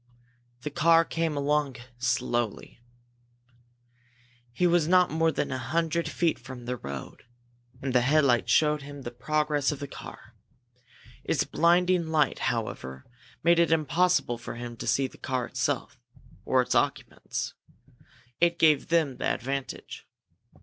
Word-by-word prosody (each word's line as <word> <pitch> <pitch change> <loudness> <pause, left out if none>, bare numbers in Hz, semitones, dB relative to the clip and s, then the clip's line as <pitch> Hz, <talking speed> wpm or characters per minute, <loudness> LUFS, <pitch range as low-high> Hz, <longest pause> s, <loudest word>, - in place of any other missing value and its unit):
The 150 - -5
car 165 +1 +4
came 165 -3 -2
along 145 -1 0 0.2
slowly. 120 -2 -1 1.7
He 180 +9 0
was 175 -3 +3
not 180 0 +4
more 160 +1 +2
than - - -2
a 130 - -2
hundred 165 +4 -1
feet 170 -2 0
from 125 -2 -10
the 125 +1 -2
road, 70 - -8 0.6
and 135 -2 -2
the 125 - +4
headlight 140 -2 +3
showed 150 -1 +3
him 145 0 -9
the 120 - -5
progress 150 +3 0
of 150 - -4
the 140 - -5
car. - - -11 0.9
Its - - +1
blinding 175 0 +2
light, 155 -3 +1
however, 65 - -4 0.4
made 170 +1 +5
it 170 -1 +3
impossible 160 -5 +2
for 120 - -7
him 120 0 -7
to - - -6
see 135 - +2
the 130 - -9
car 130 -2 -2
itself - - -2 0.5
or 130 -1 +3
its - - -2
occupants. - - -2 0.9
It 170 0 +3
gave 155 -4 +4
them 160 -5 +1
the - - -3
advantage. 135 +1 -4
150 Hz, 140 wpm, -27 LUFS, 125-165 Hz, 1.7 s, made